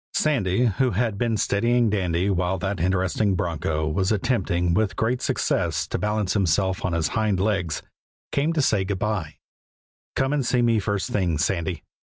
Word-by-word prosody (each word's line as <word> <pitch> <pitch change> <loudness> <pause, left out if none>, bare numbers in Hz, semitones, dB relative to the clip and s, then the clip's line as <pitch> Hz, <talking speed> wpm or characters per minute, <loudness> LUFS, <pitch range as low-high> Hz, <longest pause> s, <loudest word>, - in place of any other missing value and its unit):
Sandy, 120 -7 +2
who 125 +4 +2
had 110 -1 -1
been 115 -2 +1
steadying 115 +3 +2
Dandy 95 -1 0
while 90 0 0
that 95 +1 -3
interesting 95 +2 +1
broncho 80 -2 -1
was 95 +5 0
attempting 95 -6 0
with 105 +2 +1
great 120 +3 0
success - - 0
to - - -2
balance 105 -2 0
himself 95 -1 +1
on 95 - -1
his 80 -3 0
hind 110 -4 0
legs, 95 -6 -1 0.5
came 145 +4 +1
to 155 -3 +1
say 105 -7 +2
good 95 0 -2
by. 95 -6 -2 0.8
"Come 135 +2 +1
and 145 -2 +1
see 125 0 +1
me 115 -2 +3
first 100 -1 -2
thing, 90 -6 0
Sandy." 85 +2 -1
100 Hz, 165 wpm, -24 LUFS, 90-110 Hz, 0.8 s, me